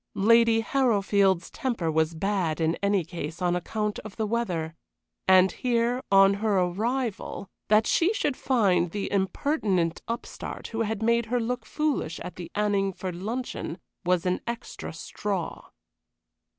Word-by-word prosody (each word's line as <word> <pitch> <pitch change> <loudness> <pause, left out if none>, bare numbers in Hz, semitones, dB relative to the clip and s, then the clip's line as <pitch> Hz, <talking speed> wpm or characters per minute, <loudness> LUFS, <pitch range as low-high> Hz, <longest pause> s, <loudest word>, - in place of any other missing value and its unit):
Lady 230 +2 +5
Harrowfield's 200 -8 +2
temper 235 - -1
was 160 +1 +1
bad 180 -3 0
in 160 0 +2
any 200 -2 +2
case 165 -1 -6
on 180 -1 +1
account 210 +4 -2
of 215 -2 -10
the 220 - -1
weather, 185 -8 -1 0.5
and 185 0 +6
here, 240 0 0
on 195 0 +7
her 205 0 +1
arrival, 210 +3 -1 0.2
that 215 +1 +4
she 345 +4 +3
should 295 -11 0
find 195 -11 +2
the 200 +3 -4
impertinent 190 - 0
upstart 230 +1 -5
who 225 0 -2
had 220 -1 -1
made 235 0 +2
her 245 +2 +1
look 240 0 -3
foolish 300 - -1
at 180 - -7
the 175 -2 -7
Anningford 195 -3 0
luncheon, 210 -2 -4 0.3
was 180 -1 +1
an 180 0 0
extra 235 0 -5
straw. - - -4
205 Hz, 140 wpm, -27 LUFS, 180-235 Hz, 0.5 s, on